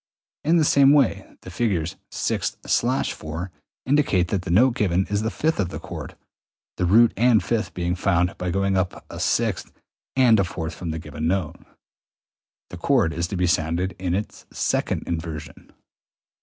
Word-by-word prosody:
In 165 +3 +3
the 160 - +3
same 140 -1 +5
way 115 -9 +2
the 90 - -9
figures 90 -6 -1 0.2
6/4 80 +4 -2 0.3
indicate 125 -11 +2
that 100 - 0
the 90 - -7
note 120 +9 +4
given 95 -4 +1
is 105 0 +1
the 110 - -1
fifth 160 +4 -1
of 95 -4 0
the - - -6
chord, - - -8 0.6
the 90 - +1
root 115 +5 +5
and 120 -2 +4
fifth 115 -2 -2
being 85 0 -1
found 90 -1 +1
by 90 - -2
going 95 +2 0
up 95 -1 -2
a - - -7
sixth - - 0 0.4
and 125 -5 +5
a - - +4
fourth 85 -2 -5
from 85 +1 -6
the 80 - -3
note 80 - -8
given; 80 +2 -2
i.e., 95 -6 -1 1.2
the 90 - -7
chord 100 -4 +2
is 85 +1 -2
to 95 - -4
be 90 - +1
sounded 85 +2 0
in 90 -1 -1
its 105 +2 -5
second - - -1
inversion. 80 -2 -6
95 Hz, 170 wpm, -23 LUFS, 85-110 Hz, 1.2 s, same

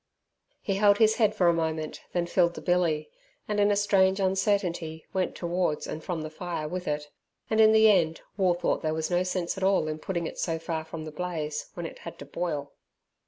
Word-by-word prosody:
He 195 -3 -1
held 205 0 +5
his 220 0 +4
head 215 -3 +3
for 185 - +2
a 170 - +5
moment, 160 -2 -2
then 175 -1 0
filled 170 0 +2
the - - -7
billy, 175 -4 +1 0.4
and 210 -1 -1
in 205 0 +4
a 205 - +3
strange 195 -1 +3
uncertainty 185 -4 0
went 185 -1 -1
towards 175 -3 -1
and 160 - -6
from 170 -3 -3
the 155 - -6
fire 165 -2 -4
with 180 +3 -5
it, 150 0 -3 0.4
and 220 0 +4
in 220 0 +7
the 220 0 +6
end 170 -6 +3
War 185 -3 +2
thought 175 - 0
there 155 -1 -1
was 160 +2 -2
no 175 0 +3
sense 180 -1 -2
at - - -4
all 190 -4 +3
in 155 0 -3
putting 170 +1 -3
it - - -6
so 165 -2 -1
far 160 -1 -3
from 160 0 -7
the 155 - -7
blaze 155 -2 -4
when 175 - -5
it - - -8
had - - -9
to 140 - -9
boil. 145 -2 -4
175 Hz, 220 wpm, -27 LUFS, 160-190 Hz, 0.4 s, in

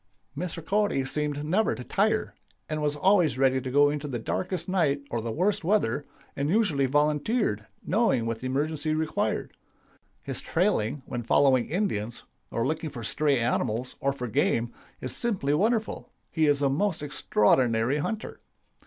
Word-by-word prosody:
"Mr. 165 0 -5
Cody 205 -10 +1
seemed 145 +1 -1
never 195 +8 +2
to 125 - -7
tire, 215 - 0 0.3
and 155 0 -3
was 150 -1 0
always 165 - +3
ready 130 0 +3
to 130 - -5
go 145 +2 +4
in 150 - -2
the 140 -4 -4
darkest 180 - -3
night 150 -7 +1
or 115 - -1
the 115 0 -3
worst 185 - 0
weather, 155 - +1 0.3
and 140 +1 -1
usually 170 -9 +2
volunteered, 150 - +1 0.2
knowing 185 - +2
what 115 -1 -2
the 130 - -4
emergency 155 +3 -1
required. 155 0 -1 0.7
His - - -4
trailing, 130 +6 0
when 120 - -4
following 130 +1 +3
Indians, 120 - -2 0.3
or 115 - -1
looking 155 0 -2
for 125 -5 -8
stray 145 +5 +1
animals, 120 0 -1
or 140 - +1
for 125 -3 -5
game, 115 +2 +1 0.3
is 130 - -3
simply 190 -12 0
wonderful. 220 +6 0 0.2
He 160 -2 +2
is 145 -1 +2
a 140 - +3
most 170 +2 0
extraordinary 120 -1 +2
hunter. 220 +8 -4
145 Hz, 160 wpm, -27 LUFS, 130-175 Hz, 0.7 s, go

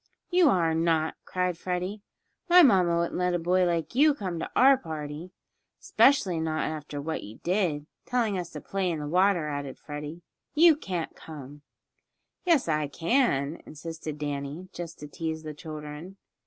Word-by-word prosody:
"You 355 -3 +5
are 170 -7 +2
not!" 160 -1 +1
cried 180 -2 -1
Freddie. 185 +3 -3 0.5
"My 355 0 +9
mamma 185 - +4
wouldn't 170 +1 -1
let 180 0 +1
a - - +3
boy 180 +2 +2
like 170 +1 -1
you 290 +3 +5
come 185 - -4
to - - -4
our 270 +2 +7
party." 155 - -6 0.5
"'Specially 195 - +3
not 160 -1 -1
after 150 -2 -5
what 160 +3 -3
you 105 +2 -10
did 175 -5 0 0.2
telling 235 -5 0
us 175 -2 -3
to 150 - -6
play 195 -2 -1
in 165 - -1
the 150 -1 -5
water," 180 0 +3
added 145 -2 -4
Freddie. 150 +3 -7 0.3
"You 325 +1 +7
can't 180 - -4
come!" 145 -2 -10 0.9
"Yes, 330 - +4
I 150 -2 +1
can," 165 - +1
insisted 155 0 -7
Danny, 145 +4 -4
just 170 -1 -7
to 150 - -6
tease 160 +1 -4
the 155 -1 -6
children. 155 +4 -8
165 Hz, 165 wpm, -27 LUFS, 150-185 Hz, 0.9 s, My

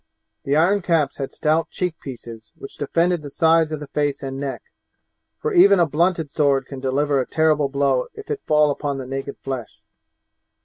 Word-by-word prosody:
The 140 - +1
iron 185 +6 +3
caps 165 -5 +1
had 135 - -4
stout 155 +1 0
cheek 180 -2 -2
pieces 115 -4 -10
which 135 - -11
defended 170 +4 +1
the 145 - -8
sides 160 +1 +3
of 155 - -3
the 150 - -7
face 145 -1 -1
and 135 0 -5
neck, 140 -1 -4 0.8
for 450 -1 -2
even 200 - +6
a 170 - +5
blunted 165 0 0
sword 140 -3 +2
can 135 0 -8
deliver 135 +1 +1
a 125 - -5
terrible 155 -3 +2
blow 135 -2 +1
if 425 0 -8
it 430 - -3
fall 150 -1 +3
upon 140 -1 -3
the 135 - -6
naked 135 +1 -5
flesh. 130 -4 -6
145 Hz, 185 wpm, -22 LUFS, 135-165 Hz, 0.8 s, even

